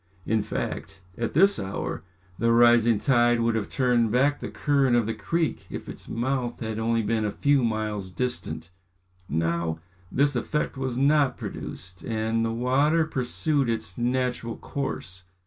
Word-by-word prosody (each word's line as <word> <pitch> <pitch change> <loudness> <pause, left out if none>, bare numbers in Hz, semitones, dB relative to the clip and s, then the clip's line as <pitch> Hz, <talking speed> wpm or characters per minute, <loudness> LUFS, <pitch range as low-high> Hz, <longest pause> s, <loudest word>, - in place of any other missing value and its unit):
In 110 0 +1
fact, 100 -1 -4 0.2
at 115 +1 -3
this 195 +5 +5
hour, 95 -5 -4 0.4
the 115 +1 +3
rising 120 -1 +5
tide 120 -1 +3
would 115 0 +2
have 110 -2 -2
turned 125 -3 +2
back 140 +5 +2
the - - -5
current 140 -4 +2
of 120 -2 +3
the 115 - -1
creek 165 +4 -2
if - - -7
its - - -9
mouth 125 0 -2
had 110 -1 -3
only 115 0 +1
been 110 0 0
a 105 - 0
few 140 +5 +2
miles 110 -4 -2
distant. 120 -5 -3 0.6
Now, 80 +1 0 0.3
this 140 +1 +2
effect 150 +6 -1
was 130 -2 -3
not 140 0 +3
produced, 90 0 -7
and 110 0 0
the 115 - 0
water 140 +7 +2
pursued 140 0 0
its 95 -6 -2
natural 125 -1 -1
course. 90 -9 -5
120 Hz, 155 wpm, -26 LUFS, 110-130 Hz, 0.6 s, this